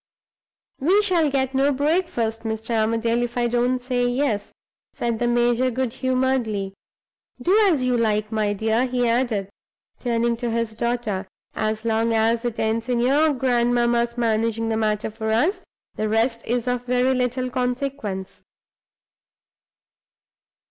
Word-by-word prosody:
"We 380 +9 +3
shall 345 -6 +3
get 265 -1 0
no 275 +2 +3
breakfast, 280 -6 0
Mr. 220 +1 -4
Armadale, 230 +2 +1
if 240 0 -3
I 240 0 +2
don't 245 +2 +1
say 245 -1 0
Yes," 245 -5 -1 0.4
said 235 -2 -2
the 240 - +1
major 240 +1 +2
good 255 -1 -2
humoredly. 255 -7 0 0.7
"Do 355 +11 +2 0.2
as 270 -6 +1
you 250 -1 +2
like, 215 -1 0
my 215 -2 0
dear," 220 +4 +1
he 245 -1 0
added, 230 -5 0 0.5
turning 235 -1 0
to 240 0 -3
his 230 -1 -1
daughter. 220 -4 -2 0.3
"As 215 +1 -2
long 225 0 +1
as 225 +1 +2
it 240 -2 -3
ends 225 +2 -1
in 245 -1 +1
your 285 +6 +3
grandmamma's 240 -2 +1
managing 225 -1 0
the 225 - 0
matter 215 0 -1
for 220 0 -4
us, 295 - +1 0.3
the 215 - -2
rest 230 +2 +1
is 245 +1 -1
of 245 0 -1
very 250 +1 +2
little 255 0 -1
consequence." 250 -6 -3
240 Hz, 140 wpm, -23 LUFS, 225-255 Hz, 0.7 s, We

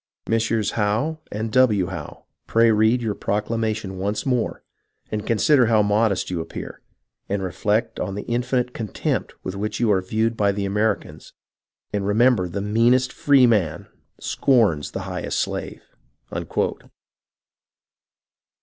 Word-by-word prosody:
" - - -53
Messieurs 115 -2 +1
Howe 115 +9 0
and 110 +1 -3
W. 110 -7 +4
Howe, 85 -5 -8 0.2
pray 115 0 +4
read 110 +3 +3
your 110 -2 0
procla 105 +1 -2
mation 110 -4 -2
once 100 +3 -2
more, 125 -4 -1 0.5
and 105 0 -3
consider 125 +2 +4
how 110 -2 +4
modest 105 -2 +1
you 85 -2 -1
appear; 80 - -8 0.5
and 100 0 -1
reflect 105 +5 -1
on 95 - -3
the 105 - -4
infinite 125 +1 -1
contempt 110 -4 -3
with 95 - -4
which 105 +2 -3
you 115 -3 +3
are 95 -2 +3
viewed 110 +5 0
by 100 -2 +2
the 100 0 -2
Americans, 105 +3 -2 0.6
and 100 -1 -1
remember 110 -3 +3
the 100 +3 -3
meanest 120 +5 +3
free 140 -3 +5
man 100 -10 +1 0.3
scorns 110 - +2
the - - -5
highest - - -4
slave." - - -3
110 Hz, 140 wpm, -23 LUFS, 100-115 Hz, 0.6 s, free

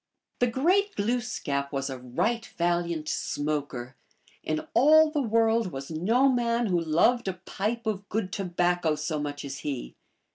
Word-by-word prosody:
The 245 - +3
great 360 - +2
Glooskap 205 - -1
was 135 -1 -2
a 130 -2 -5
right 215 - -1
valiant 170 -2 0
smoker; 145 -5 -3 0.5
in 155 0 -2
all 310 +4 +6
the 300 -2 0
world 225 -3 +2
was 135 +2 -7
no 220 +12 +3
man 240 -2 +1
who 180 -5 +1
loved 175 +9 +2
a 190 - 0
pipe 210 +5 -4
of 205 -2 -3
good 200 -3 -2
tobacco 175 -3 +1
so 150 +1 -2
much 145 -1 -4
as 135 0 -6
he. 135 - -4
180 Hz, 150 wpm, -27 LUFS, 150-235 Hz, 0.5 s, all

